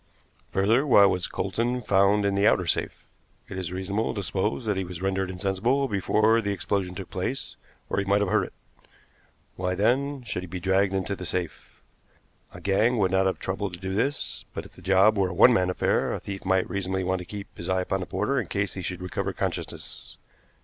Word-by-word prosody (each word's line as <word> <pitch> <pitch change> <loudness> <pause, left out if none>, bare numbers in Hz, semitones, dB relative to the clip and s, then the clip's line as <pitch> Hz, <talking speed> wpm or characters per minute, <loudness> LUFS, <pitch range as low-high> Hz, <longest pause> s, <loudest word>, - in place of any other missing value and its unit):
Further, 115 +9 +2
why 100 -6 +7
was 90 -2 +1
Coulsdon 120 +2 -1
found 100 0 +3
in 100 - +2
the 100 +1 +3
outer 90 - +3
safe? 85 - -1 0.4
It - - -7
is 90 -2 -4
reasonable 95 +4 -2
to 100 - -3
suppose 105 +6 -1
that 105 -2 +1
he 95 - -1
was 90 -2 -7
rendered 95 0 -1
insensible 100 +9 0
before 110 +2 +2
the 100 -2 -1
explosion 95 -1 -2
took 95 -1 -8
place, 95 +9 -3 0.3
or - - -1
he 100 - -1
might 100 +1 +3
have 100 -1 0
heard 105 -3 +3
it. - - -12 1.0
Why, 90 0 -1
then, 130 +7 +1
should 105 -6 -3
he 90 - -7
be 90 +2 -5
dragged 95 +1 +2
into 95 +1 -1
the 95 - -8
safe? 90 -3 -5 0.7
A - - -10
gang 110 +5 +2
would 95 -3 +2
not 95 0 +3
have 95 - 0
troubled 95 -1 -3
to - - -15
do 95 +1 -4
this, 135 +8 -1
but, - - -4
if - - -13
the - - -15
job 95 +3 +4
were 95 -2 +2
a 90 - -6
one 125 - +7
man 90 -4 +2
affair, 90 - +1
the - - -3
thief 95 -1 -7
might 95 0 +2
reasonably 95 0 -2
want 95 0 0
to 90 - -7
keep 100 +1 -8
his 85 - -6
eye 95 0 +2
upon 95 +1 -1
the 90 - -5
porter - - 0
in - - -7
case 100 -1 -1
he 95 - -5
should 90 0 -4
recover 90 - -3
consciousness. - - -5
95 Hz, 220 wpm, -26 LUFS, 95-105 Hz, 1.0 s, why